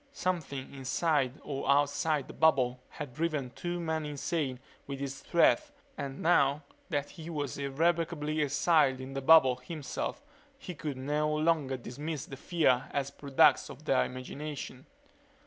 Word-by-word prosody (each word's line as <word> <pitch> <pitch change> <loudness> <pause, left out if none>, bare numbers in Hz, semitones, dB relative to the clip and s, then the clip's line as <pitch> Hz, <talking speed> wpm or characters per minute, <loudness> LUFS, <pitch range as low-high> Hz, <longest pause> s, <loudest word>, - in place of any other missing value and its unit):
Something 155 - -3
inside 140 0 0
or 140 -1 -4
outside 145 +1 +2
the - - -9
bubble 130 -6 +3
had 145 -5 -7
driven 150 -4 -2
two 175 +6 -4
men 160 -2 -1
insane 145 -2 -2 0.3
with 140 -1 -5
its 135 -1 -4
threat 295 - +3 0.3
and 140 -1 -5
now 150 -3 +3 0.3
that 145 -4 -2
he 165 -2 -9
was 145 -6 -3
irrevocably 155 +1 0
exiled 145 -2 +3
in 130 +1 -7
the 135 - -3
bubble, 135 -3 +7
himself, 140 +1 -5 0.3
he 180 - -7
could 150 -4 -5
no 150 +3 0
longer 155 -4 +1
dismiss 145 +5 -5
their 135 - -8
fear 140 -6 +1
as 140 -1 -2
products 140 -1 +3
of - - -11
their 65 - +3
imagination. 135 - -6
145 Hz, 145 wpm, -31 LUFS, 135-160 Hz, 0.3 s, bubble